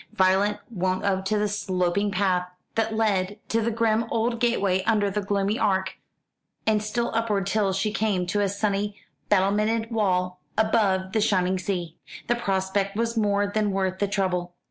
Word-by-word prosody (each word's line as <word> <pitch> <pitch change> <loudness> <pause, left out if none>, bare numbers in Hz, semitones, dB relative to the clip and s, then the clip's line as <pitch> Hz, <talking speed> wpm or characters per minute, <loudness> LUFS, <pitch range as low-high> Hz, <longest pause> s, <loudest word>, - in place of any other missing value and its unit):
Violet 195 +1 +3
went 185 -2 -1
up 190 -1 +1
the 210 +1 +1
sloping 195 -1 0
path 185 -2 0 0.2
that 225 0 0
led 205 -3 +1
to 230 - +1
the 225 - 0
grim 230 0 +1
old 230 +1 0
gateway 200 -6 +2
under 210 -3 +2
the 210 +2 -1
gloomy 200 +3 0
arch, 190 -1 0 0.7
and 215 -1 +2
still 235 +3 -2
upward 220 -4 0
till 200 0 +1
she 195 +3 -1
came 205 -5 0
to 205 +4 0
a 200 - +1
sunny 200 0 -1 0.3
battlemented 215 +3 +2
wall 180 -4 0 0.2
above 200 -4 +2
the 220 - +1
shining 190 -3 +2
sea. 175 -3 -3 0.3
The - - +2
prospect 195 -2 -1
was 230 +1 0
more 205 -2 +2
than 210 +1 0
worth 190 -1 -1
the 205 - +1
trouble. 180 -3 -1
200 Hz, 165 wpm, -25 LUFS, 190-215 Hz, 0.7 s, Violet